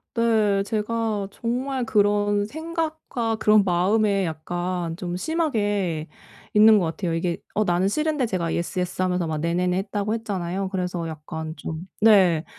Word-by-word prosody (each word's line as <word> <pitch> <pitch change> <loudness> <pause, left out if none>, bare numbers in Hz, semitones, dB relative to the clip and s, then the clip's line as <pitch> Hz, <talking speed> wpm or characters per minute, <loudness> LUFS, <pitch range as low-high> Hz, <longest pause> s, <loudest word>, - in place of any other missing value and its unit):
네. 215 -4 +2
제가 215 -1 -1
정말 250 +4 -2
그런 205 -1 +2
생각과 315 -5 -3
그런 215 -1 +4
마음에 195 +2 +2
약간 175 +1 -3
좀 175 -1 -4
심하게 205 - -1 0.5
있는 215 0 +7
것 180 - 0
같아요. 165 +1 -2
이게 170 +1 -1 0.2
어 215 - +2
나는 180 0 +1
싫은데 300 +4 0
제가 185 -6 -2
"Yes, 170 +2 -2
yes." 180 +1 -2
하면서 180 -2 0
막 155 -1 -2
"네네네." 180 +3 0
했다고 205 +2 -2
했잖아요. 195 -3 -3
그래서 180 -3 -3
약간 160 0 -6
좀 160 0 -5 0.2
네. 190 -7 +5
195 Hz, 305 characters per minute, -24 LUFS, 175-220 Hz, 0.5 s, 있는